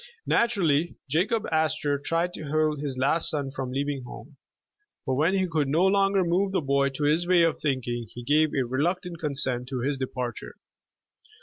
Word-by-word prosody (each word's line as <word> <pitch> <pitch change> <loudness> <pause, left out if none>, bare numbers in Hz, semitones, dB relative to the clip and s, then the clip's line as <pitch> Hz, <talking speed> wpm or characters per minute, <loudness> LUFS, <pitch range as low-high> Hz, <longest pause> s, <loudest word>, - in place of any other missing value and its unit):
Naturally, 175 -9 +2
Jacob 195 - 0
Astor 155 -2 +1
tried 165 +4 -1
to 150 - -7
hold 155 -1 +1
his 140 -3 -3
last 145 +5 +1
son 140 -3 -2
from 135 -2 -4
leaving 140 +1 -2
home, 125 - -11 0.7
but 130 - 0
when 155 +8 +2
he 190 -1 +2
could 155 -4 0
no 160 +7 +2
longer 195 0 +3
move 185 +3 +1
the - - +2
boy 140 -1 +2
to 135 +2 -5
his 155 +4 +2
way 180 -2 +5
of 165 - +1
thinking, 120 -5 -2
he 120 - -9
gave 155 +4 +3
a 135 -3 +1
reluctant 170 +7 -2
con 150 -3 -3
sent 125 -2 -1
to 130 -2 -3
his 140 +2 -1
departure. 125 -2 -5
150 Hz, 185 wpm, -26 LUFS, 135-170 Hz, 0.7 s, way